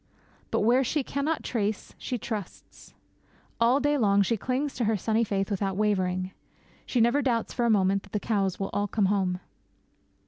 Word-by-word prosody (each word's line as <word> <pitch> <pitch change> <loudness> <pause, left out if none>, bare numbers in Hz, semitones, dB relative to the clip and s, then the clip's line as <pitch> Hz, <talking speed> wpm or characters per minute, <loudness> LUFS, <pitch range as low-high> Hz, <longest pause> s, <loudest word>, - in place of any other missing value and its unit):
But - - 0
where 245 +5 +4
she 280 +3 0
cannot 285 +5 -2
trace 215 -3 -2
she 250 - -3
trusts. 210 -4 -7
And - - -29 0.6
all 240 +4 +4
day 290 0 +1
long 200 -3 +4
she 230 - +1
clings 260 +6 -2
to 240 - -1
her 215 0 +2
sunny 220 +4 +1
faith 200 -1 -1
without 195 -1 -1
wavering. 185 -3 0 0.6
She 250 - 0
never 240 +5 +4
doubts 240 -4 0
for 240 - 0
a - - +3
moment 195 -2 +3
that 195 - -18
the 210 - -1
cows 195 -4 -1
will 195 - -3
all 205 0 0
come 205 0 +1
home. 190 -2 0
215 Hz, 185 wpm, -27 LUFS, 195-245 Hz, 0.6 s, where